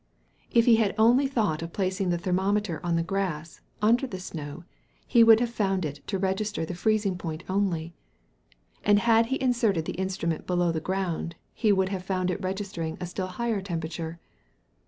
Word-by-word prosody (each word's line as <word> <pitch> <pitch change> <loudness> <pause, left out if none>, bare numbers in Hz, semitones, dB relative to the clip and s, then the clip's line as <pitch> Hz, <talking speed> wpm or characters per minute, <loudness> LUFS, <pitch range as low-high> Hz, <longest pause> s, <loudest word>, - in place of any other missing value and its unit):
If 230 -1 +4
he 230 -2 +6
had 215 -3 +1
only 240 +5 +5
thought 210 - 0
of 165 0 -6
placing 190 -1 -1
the 175 - +1
thermometer 190 0 0
on 170 -1 0
the 165 - +1
grass, 170 -4 -3 0.2
under 240 +5 +4
the 185 -6 -6
snow, 155 -3 -7 0.4
he 235 -2 +5
would 225 -1 +8
have 240 -1 0
found 195 -5 0
it 145 -1 -5
to 195 - -1
register 190 -1 -1
the 180 - -5
freezing 200 0 0
point 160 -1 -5
only. 180 -4 -1 0.9
And 205 0 +5
had 230 +1 +4
he 265 +2 -1
inserted 230 -10 +1
the - - -3
instrument 175 -4 -2
below 175 -1 +2
the 160 - -1
ground, 180 -2 -2 0.2
he 215 -3 +2
would 190 -1 +2
have 190 -2 -3
found 185 -1 -1
it 180 - -4
registering 185 -4 -3
a 180 - -3
still 185 +2 -4
higher 225 +2 -2
temperature. 165 -2 -4
190 Hz, 180 wpm, -27 LUFS, 170-215 Hz, 0.9 s, would